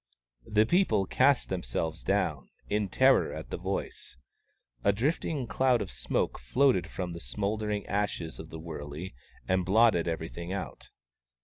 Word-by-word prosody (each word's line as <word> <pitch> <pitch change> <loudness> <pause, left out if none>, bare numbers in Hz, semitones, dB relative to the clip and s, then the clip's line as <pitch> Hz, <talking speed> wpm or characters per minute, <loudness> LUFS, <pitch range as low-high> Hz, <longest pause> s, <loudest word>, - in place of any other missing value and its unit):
The 105 +1 +4
people 175 - +3
cast 135 +6 +3
themselves 80 -1 -3
down, 80 -10 0 0.2
in 105 -1 0
terror - - +4
at - - -7
the - - -2
voice. - - -5 0.7
A 100 - +5
drifting 135 +4 -1
cloud 125 +2 +2
of 100 -3 -4
smoke - - -1
floated 130 -8 +2
from 90 -2 -4
the 85 - -7
smouldering 105 - -2
ashes 100 -5 -2
of 80 - -8
the 80 - -7
wurley 80 +1 -7 0.3
and 95 0 +2
blotted 100 -2 +4
everything 85 +1 -4
out. 100 - -6
100 Hz, 140 wpm, -29 LUFS, 85-110 Hz, 0.7 s, A